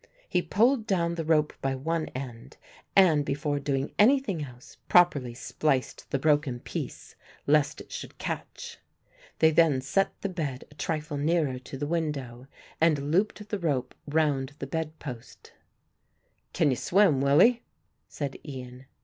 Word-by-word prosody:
He 180 Hz, -, +1 dB
pulled 230 Hz, +5 st, +2 dB
down 170 Hz, -4 st, +1 dB
the 170 Hz, -1 st, -3 dB
rope 155 Hz, -1 st, +2 dB
by 135 Hz, 0 st, 0 dB
one 160 Hz, +4 st, -2 dB
end 130 Hz, 0 st, -7 dB, 0.4 s
and, 165 Hz, -7 st, +6 dB
before 145 Hz, +1 st, -1 dB
doing 135 Hz, -1 st, -2 dB
anything 210 Hz, -, +3 dB
else, 125 Hz, -3 st, -12 dB
properly 145 Hz, -9 st, +4 dB
spliced 135 Hz, +1 st, -2 dB
the -, -, 0 dB
broken 145 Hz, -3 st, +1 dB
piece -, -, -6 dB, 0.3 s
lest 150 Hz, 0 st, +2 dB
it -, -, -14 dB
should -, -, -7 dB
catch. 475 Hz, -1 st, -6 dB, 0.6 s
They 160 Hz, 0 st, +5 dB
then 160 Hz, -4 st, +4 dB
set 140 Hz, +9 st, 0 dB
the 200 Hz, -, -2 dB
bed 150 Hz, -8 st, -4 dB
a -, -, -14 dB
trifle 155 Hz, -1 st, -3 dB
nearer 150 Hz, -3 st, +1 dB
to 135 Hz, +2 st, -9 dB
the 145 Hz, -, -3 dB
window 140 Hz, -6 st, -3 dB, 0.3 s
and 150 Hz, -3 st, +2 dB
looped 210 Hz, +4 st, 0 dB
the 205 Hz, -, -2 dB
rope 135 Hz, -7 st, -1 dB
round 145 Hz, -3 st, +1 dB
the -, -, -5 dB
bed 160 Hz, +2 st, -4 dB
post. 125 Hz, -5 st, -10 dB, 1.0 s
"Can 145 Hz, -, +2 dB
you 125 Hz, -, 0 dB
swim, 180 Hz, -8 st, +3 dB
Willie?" 165 Hz, -, +5 dB, 0.5 s
said 140 Hz, -3 st, -5 dB
Ian. 130 Hz, -2 st, -9 dB
150 Hz, 150 wpm, -28 LUFS, 135-170 Hz, 1.0 s, and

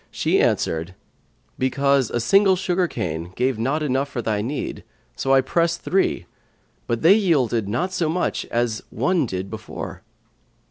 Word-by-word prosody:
she -, -, +1 dB
answered, 80 Hz, +3 st, 0 dB, 0.6 s
"Because 140 Hz, 0 st, +2 dB
a 120 Hz, -, -1 dB
single 195 Hz, -, +4 dB
sugar 180 Hz, 0 st, 0 dB
cane 85 Hz, -, -4 dB
gave 125 Hz, -2 st, 0 dB
not 140 Hz, +7 st, 0 dB
enough 135 Hz, 0 st, 0 dB
for 130 Hz, -, -5 dB
thy 110 Hz, -3 st, -1 dB
need; 135 Hz, +7 st, -4 dB, 0.3 s
so 135 Hz, -, -1 dB
I 135 Hz, 0 st, +6 dB
pressed 170 Hz, +5 st, 0 dB
three; 190 Hz, +1 st, +1 dB, 0.6 s
but 115 Hz, -1 st, -2 dB
they 170 Hz, +4 st, +8 dB
yielded 130 Hz, -, +1 dB
not 130 Hz, -, -1 dB
to 175 Hz, -4 st, 0 dB
much 175 Hz, +3 st, -1 dB
as 115 Hz, -2 st, -1 dB
one 140 Hz, -, +1 dB
did 95 Hz, -1 st, -4 dB
before." 110 Hz, -1 st, -7 dB
135 Hz, 150 wpm, -22 LUFS, 115-170 Hz, 0.6 s, they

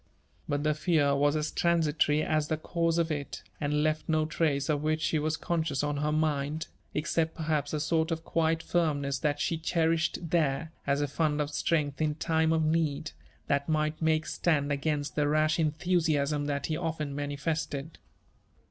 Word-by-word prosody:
But 145 Hz, 0 st, 0 dB
the 155 Hz, 0 st, +2 dB
fear 155 Hz, -3 st, +2 dB
was 145 Hz, +1 st, +2 dB
as 155 Hz, 0 st, -1 dB
transitory 155 Hz, -3 st, +2 dB
as 155 Hz, -1 st, +1 dB
the 155 Hz, -, -1 dB
cause 165 Hz, +1 st, 0 dB
of 165 Hz, -1 st, +1 dB
it, 145 Hz, -2 st, -4 dB, 0.2 s
and 150 Hz, 0 st, 0 dB
left 155 Hz, +1 st, -1 dB
no 155 Hz, -1 st, +2 dB
trace 155 Hz, -3 st, 0 dB
of 150 Hz, -2 st, +1 dB
which 155 Hz, +1 st, +1 dB
she 155 Hz, -, +1 dB
was 155 Hz, +1 st, -1 dB
con 170 Hz, -2 st, -1 dB
scious 145 Hz, -2 st, -1 dB
on 145 Hz, 0 st, -2 dB
her 150 Hz, +1 st, 0 dB
mind, 155 Hz, 0 st, 0 dB, 0.3 s
except 160 Hz, +1 st, 0 dB
perhaps 155 Hz, -3 st, -1 dB
a 155 Hz, -, -1 dB
sort 160 Hz, +2 st, +1 dB
of 165 Hz, -1 st, -2 dB
quiet 165 Hz, 0 st, +1 dB
firmness 145 Hz, -5 st, 0 dB
that 145 Hz, -2 st, 0 dB
she 165 Hz, +2 st, 0 dB
cherished 165 Hz, 0 st, 0 dB
there, 160 Hz, -1 st, +1 dB, 0.2 s
as 140 Hz, +1 st, +2 dB
a 145 Hz, -, +1 dB
fund 150 Hz, +1 st, 0 dB
of 150 Hz, 0 st, -1 dB
strength 150 Hz, -2 st, 0 dB
in 150 Hz, -1 st, +1 dB
time 160 Hz, 0 st, +1 dB
of 160 Hz, -1 st, +2 dB
need, 155 Hz, -2 st, 0 dB, 0.3 s
that 140 Hz, +2 st, 0 dB
might 155 Hz, 0 st, 0 dB
make 160 Hz, -1 st, +2 dB
stand 150 Hz, -4 st, 0 dB
against 145 Hz, 0 st, -1 dB
the 150 Hz, -1 st, +2 dB
rash 155 Hz, +2 st, +2 dB
enthusiasm 155 Hz, -3 st, +1 dB
that 140 Hz, -1 st, -2 dB
he 155 Hz, -, -1 dB
often 160 Hz, -3 st, -3 dB
manifested. 145 Hz, +1 st, -3 dB
155 Hz, 180 wpm, -29 LUFS, 145-160 Hz, 0.3 s, the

